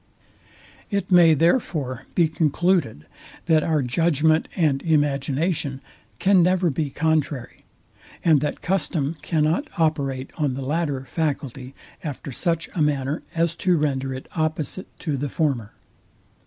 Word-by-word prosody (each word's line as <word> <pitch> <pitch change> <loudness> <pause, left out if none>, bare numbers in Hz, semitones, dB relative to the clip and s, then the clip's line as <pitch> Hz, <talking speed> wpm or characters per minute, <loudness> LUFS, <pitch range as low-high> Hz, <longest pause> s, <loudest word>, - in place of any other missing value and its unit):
It 200 -3 -2
may, 170 -3 +7
therefore, 155 - 0
be 170 -2 +4
concluded, 160 - 0 0.4
that 160 -2 +4
our 155 -2 +1
judgment 155 +4 +2
and 150 -6 +2
imagination 145 -1 0 0.4
can 190 -1 +4
never 180 -1 +3
be 145 +1 -2
contrary, 150 -3 -1 0.6
and 155 -5 +5
that 150 -1 -3
custom 165 -5 -1
cannot 160 - +1
operate 140 -5 0
on 145 -4 0
the 135 - -4
latter 145 -2 -1
faculty 135 -4 -3 0.3
after 145 -2 -5
such 165 +5 0
a 170 - -1
manner, 145 0 0
as 165 0 +1
to 180 -1 +2
render 135 -3 -1
it 130 0 -6
opposite 155 +2 -2
to 150 -5 -2
the 145 +2 -3
former. 130 -10 -1
155 Hz, 130 wpm, -23 LUFS, 135-165 Hz, 0.6 s, may